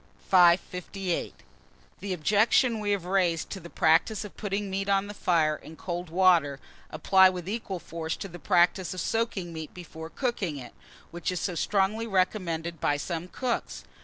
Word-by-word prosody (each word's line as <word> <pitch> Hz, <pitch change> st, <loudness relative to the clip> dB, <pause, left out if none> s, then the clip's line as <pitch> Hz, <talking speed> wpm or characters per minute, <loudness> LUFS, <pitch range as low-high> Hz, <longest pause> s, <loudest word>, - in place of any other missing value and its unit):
558. 180 Hz, 0 st, +2 dB, 0.6 s
THE 195 Hz, -1 st, -3 dB
OBJECTIONS 215 Hz, -, +3 dB
WE 205 Hz, -, -2 dB
HAVE 200 Hz, -4 st, 0 dB
RAISED 180 Hz, -3 st, 0 dB
to 195 Hz, -, -5 dB
the 170 Hz, -, -11 dB
practice 180 Hz, +8 st, +2 dB
of 205 Hz, -, -11 dB
putting 205 Hz, -1 st, -3 dB
meat 195 Hz, +1 st, -2 dB
on 195 Hz, 0 st, +2 dB
the 205 Hz, -, -7 dB
fire 165 Hz, -6 st, +2 dB
in 160 Hz, -, -12 dB
cold 175 Hz, 0 st, -5 dB
water, 165 Hz, -6 st, +3 dB, 0.3 s
apply 190 Hz, +4 st, +5 dB
with 180 Hz, -2 st, -6 dB
equal 205 Hz, -2 st, -3 dB
force 165 Hz, -1 st, -5 dB
to -, -, -6 dB
the 175 Hz, -1 st, -10 dB
practice 175 Hz, +6 st, +2 dB
of -, -, -5 dB
soaking 195 Hz, -4 st, -2 dB
meat 160 Hz, -1 st, -7 dB
before 160 Hz, -2 st, -9 dB
cooking 205 Hz, -, -2 dB
it, 125 Hz, -3 st, -9 dB, 0.4 s
which 175 Hz, +2 st, -3 dB
is 180 Hz, -, -2 dB
so 180 Hz, -, -2 dB
strongly 205 Hz, +5 st, 0 dB
recommended 180 Hz, -4 st, -1 dB
by 145 Hz, -, +2 dB
some 170 Hz, +3 st, -4 dB
cooks. 245 Hz, +5 st, -3 dB
180 Hz, 165 wpm, -27 LUFS, 165-200 Hz, 0.6 s, apply